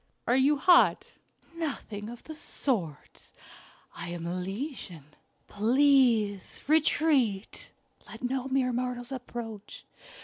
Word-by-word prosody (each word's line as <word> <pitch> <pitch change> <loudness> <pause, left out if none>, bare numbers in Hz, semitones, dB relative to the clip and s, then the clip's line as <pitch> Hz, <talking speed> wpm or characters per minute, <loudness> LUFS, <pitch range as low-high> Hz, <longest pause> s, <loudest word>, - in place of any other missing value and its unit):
"Are 245 - +3
you 275 +3 +4
hot?" 350 +4 +5 0.5
"Nothing 250 -10 -5
of 240 0 -10
the 315 - -8
sort. 200 - -4 0.6
I - - -6
am 170 -1 -5
Elysian. 180 - -5 0.3
Please 230 -3 +2
retreat. 290 -9 +1 0.4
Let 225 +3 -10
no 260 +1 -1
mere 260 -2 +1
mortals 245 0 -3
approach. 235 -5 -7
245 Hz, 100 wpm, -29 LUFS, 205-270 Hz, 0.6 s, hot